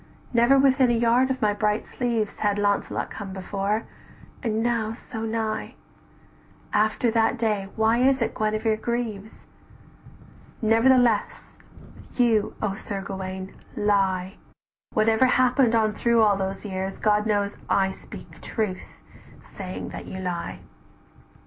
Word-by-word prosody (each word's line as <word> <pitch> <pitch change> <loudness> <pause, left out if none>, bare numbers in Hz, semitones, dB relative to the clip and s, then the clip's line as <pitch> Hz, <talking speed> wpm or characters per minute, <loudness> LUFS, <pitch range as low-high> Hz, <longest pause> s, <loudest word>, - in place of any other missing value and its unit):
"Never 240 +3 +5
within 265 -1 +4
a 240 - +3
yard 240 +3 +3
of 260 -3 -2
my 210 -1 +3
bright 210 +1 0
sleeves 230 -4 -2
Had 205 -1 +1
Launcelot 205 -1 0
come 200 -3 -7
before: 200 +3 -2 0.6
and 225 -3 -1
now 230 -2 0
so 225 -1 -8
nigh! 220 -1 -3 1.0
After 220 +2 +2
that 225 +2 +2
day 210 -4 0
why 220 +1 +3
is 265 +1 +4
it 230 - -1
Guenevere 215 +1 0
grieves? 220 -3 -4 1.1
"Nevertheless 230 0 +2 0.6
you, 230 -4 +2
O 205 -2 0
Sir 195 0 -5
Gauwaine, 190 0 -6 0.2
lie, 195 -2 +1 0.5
Whatever 220 +3 +3
happened 250 -1 +3
on 215 -1 +2
through 235 +1 +3
all 205 -2 +4
those 195 +1 -4
years, 190 -1 -4
God 210 0 +2
knows 205 -1 0
I 190 -1 +2
speak - - -12
truth, 210 -5 -4 0.5
saying 185 -2 -7
that - - -8
you 190 - -6
lie. 180 -2 -4
215 Hz, 130 wpm, -25 LUFS, 200-235 Hz, 1.1 s, Never